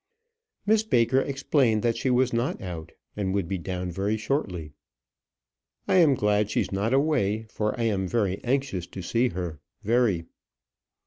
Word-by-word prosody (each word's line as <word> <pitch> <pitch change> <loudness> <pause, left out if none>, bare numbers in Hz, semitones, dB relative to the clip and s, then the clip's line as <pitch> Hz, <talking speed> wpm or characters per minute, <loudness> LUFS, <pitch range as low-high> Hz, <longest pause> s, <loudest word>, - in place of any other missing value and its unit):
Miss 215 +1 +4
Baker 130 - +3
explained 135 -5 +1
that 115 -1 +2
she 130 - -1
was 125 0 +2
not 120 +3 0
out; 85 -4 -7 0.2
and 100 -2 -1
would 100 -4 0
be 95 +1 -2
down 90 0 -4
very 100 +5 -1
shortly. 95 - -2 1.2
"I'm 165 -7 +5
glad 105 -2 +1
she's - - -1
not 100 +4 0
away, 130 -7 +2
for 110 +1 -3
I - - 0
am 100 -4 0
very 100 -2 -1
anxious 125 -8 -1
to 95 - -8
see 120 +7 +1
her 85 -6 -5 0.2
very." 110 -7 +2
110 Hz, 150 wpm, -26 LUFS, 95-130 Hz, 1.2 s, I'm